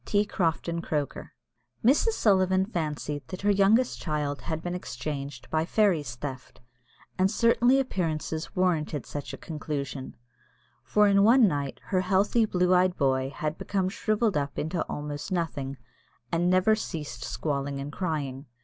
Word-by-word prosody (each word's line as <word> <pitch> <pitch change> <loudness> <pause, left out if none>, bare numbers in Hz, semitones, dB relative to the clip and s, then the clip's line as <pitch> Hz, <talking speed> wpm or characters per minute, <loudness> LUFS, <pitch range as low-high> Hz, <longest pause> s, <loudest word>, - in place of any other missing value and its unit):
T. 205 0 +1
CROFTON 170 -3 -1
CROKER. 150 -4 -3 0.5
Mrs. 295 - +4
Sullivan 190 - +3
fancied 150 - -3
that 185 - -7
her 205 - +4
youngest 205 +5 +3
child 150 -3 -2
had 160 0 -4
been 175 - -3
exchanged 145 -7 -5
by 155 0 +2
"fairies 165 - +1
theft," 130 0 -7 0.6
and 190 +1 +4
certainly 235 +4 +4
appearances 160 - -2
warranted 160 -6 0
such 145 -1 -6
a - - -7
conclusion; 145 -4 -5 0.7
for 210 0 +3
in 200 0 +5
one 230 +3 +6
night 145 -5 -2
her 185 -2 0
healthy, 195 +5 +2
blue 180 -3 +2
eyed 180 0 +3
boy 130 -1 +1
had 150 +3 -4
become 190 -2 -1
shrivelled 215 +1 0
up 140 -1 -2
into 160 +2 -1
almost 145 +2 -5
nothing, 145 -6 -2 0.5
and 175 +1 +2
never 185 +4 +4
ceased 160 -8 -5
squalling 140 -2 -2
and 140 +1 -5
crying. 145 -6 -3
170 Hz, 145 wpm, -27 LUFS, 145-195 Hz, 0.7 s, one